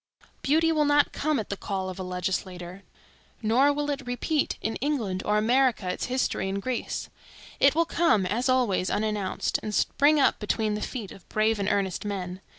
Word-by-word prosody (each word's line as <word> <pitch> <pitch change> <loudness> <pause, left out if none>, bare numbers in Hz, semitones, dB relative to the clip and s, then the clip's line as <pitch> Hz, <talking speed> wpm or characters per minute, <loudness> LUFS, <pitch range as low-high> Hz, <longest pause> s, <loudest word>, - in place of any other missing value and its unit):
Beauty 320 +3 +3
will 305 -2 +2
not 290 0 +3
come 300 -2 0
at 215 - -5
the - - -1
call 190 -1 -3
of 185 0 -6
a - - -3
legislature, 180 0 -4 0.6
nor 250 +7 +4
will 290 0 -1
it 275 -2 -5
repeat 285 +5 -1
in 220 - -2
England 230 -10 -1
or 210 0 +1
America 240 -2 +2
its 180 - -2
history 250 -6 -1
in 195 +1 -2
Greece. 250 +3 -3 0.5
It 275 +1 +5
will 335 +1 +3
come, 325 - +2
as 230 +8 0
always, 235 -8 +2
unannounced, 210 -3 -1
and 210 -1 -4
spring 295 +2 +3
up 275 - +3
between 215 0 0
the 210 - -3
feet 225 -7 -5
of 195 - -14
brave 215 0 +1
and 200 0 0
earnest 195 -3 0
men. 190 -3 -4
215 Hz, 185 wpm, -27 LUFS, 195-275 Hz, 0.6 s, It